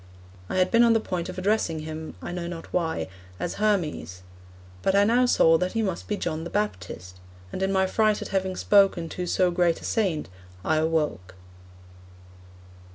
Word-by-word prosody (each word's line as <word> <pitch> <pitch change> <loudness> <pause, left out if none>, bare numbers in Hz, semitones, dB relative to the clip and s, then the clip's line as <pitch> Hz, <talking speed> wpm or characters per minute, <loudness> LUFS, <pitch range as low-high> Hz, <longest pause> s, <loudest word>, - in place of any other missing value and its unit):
I - - -3
had 185 0 +2
been 230 - +5
on 235 -1 +6
the 225 - +3
point 180 -5 -4
of 185 - -7
addressing 185 -5 0
him 155 0 -7
I - - -5
know 175 -1 -4
not 170 -1 -8
why 160 - -1 0.3
as 175 - -3
Hermes. 165 - -1 0.6
But 195 - +1
I 200 - +6
now 240 +4 +3
saw 165 -8 +5
that 180 0 -1
he 225 - 0
must 190 -4 -3
be 210 - -1
John 160 -3 -3
the 170 - -6
Baptist; 90 - -4 0.3
and - - -5
in 190 0 +1
my 190 -1 +3
fright 215 +2 +2
at - - -6
having 190 -1 -1
spoken 195 -5 +3
to 180 +1 -4
so 180 0 +2
great 175 -1 +2
a - - -10
Saint 185 -9 0 0.4
I 155 - +2
awoke. 150 - -1
180 Hz, 185 wpm, -26 LUFS, 160-200 Hz, 0.6 s, on